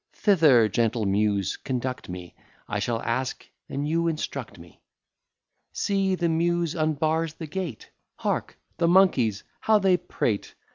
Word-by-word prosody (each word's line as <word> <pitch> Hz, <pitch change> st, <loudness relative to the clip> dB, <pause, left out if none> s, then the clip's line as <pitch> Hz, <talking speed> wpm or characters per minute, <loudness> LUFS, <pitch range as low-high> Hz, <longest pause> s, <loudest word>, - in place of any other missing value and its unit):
Thither, 155 Hz, -, +5 dB
gentle 115 Hz, +1 st, 0 dB
Muse, 100 Hz, -1 st, +1 dB
conduct 130 Hz, -3 st, -4 dB
me; 90 Hz, -1 st, -7 dB, 0.3 s
I 105 Hz, -, -2 dB
shall 115 Hz, +2 st, -2 dB
ask, 130 Hz, +3 st, -2 dB, 0.2 s
and 140 Hz, +2 st, -2 dB
you 165 Hz, +2 st, +1 dB
instruct 135 Hz, -9 st, -4 dB
me. 85 Hz, -1 st, -16 dB, 0.9 s
See, 195 Hz, -1 st, +1 dB
the 175 Hz, -2 st, 0 dB
Muse 170 Hz, 0 st, +1 dB
unbars 155 Hz, 0 st, 0 dB
the 165 Hz, -, -6 dB
gate; 160 Hz, -, -5 dB, 0.2 s
Hark, -, -, -2 dB, 0.2 s
the 170 Hz, -, +2 dB
monkeys, 140 Hz, -, +4 dB, 0.2 s
how 220 Hz, -1 st, +4 dB
they 190 Hz, -3 st, +3 dB
prate! 105 Hz, -, -2 dB
145 Hz, 135 wpm, -26 LUFS, 110-170 Hz, 0.9 s, Thither